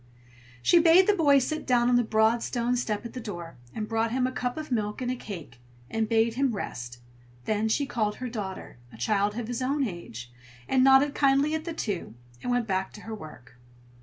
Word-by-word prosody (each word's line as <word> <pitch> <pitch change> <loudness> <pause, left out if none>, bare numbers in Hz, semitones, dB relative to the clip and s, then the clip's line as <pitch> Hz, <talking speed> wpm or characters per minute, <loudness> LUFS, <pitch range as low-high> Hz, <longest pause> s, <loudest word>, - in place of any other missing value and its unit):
She 345 - +6
bade 335 +3 +6
the 415 - +4
boy 295 -7 +5
sit 310 +4 -1
down 240 -2 +3
on 245 - +4
the 245 - +5
broad 220 +1 +2
stone 240 +1 -1
step 225 -3 -2
at 235 - -7
the 255 - -5
door, 175 - -7
and 215 -1 -4
brought 225 0 0
him 255 +1 +1
a 255 - -1
cup 250 0 -3
of 310 -3 -6
milk 210 -3 -1
and 250 -1 -1
a - - -2
cake, 165 - -9 0.3
and 225 -1 -1
bade 225 0 +3
him 260 -2 0
rest; 120 -10 -6 0.5
then 215 +1 0
she 285 +6 +1
called 215 -6 -1
her 255 - -5
daughter, 200 - -6
a - - -13
child 205 - 0
of 240 -2 -3
his 245 +1 -3
own 275 +3 0
age, 125 - -8 0.4
and 260 -1 +3
nodded 270 +2 +6
kindly 275 +2 +3
at 315 0 -2
the 335 - -4
two, 195 - -4 0.3
and - - -4
went 245 -1 +1
back 190 -2 -1
to 210 - -11
her 225 - -7
work. 125 - -11
230 Hz, 220 wpm, -27 LUFS, 205-260 Hz, 0.5 s, She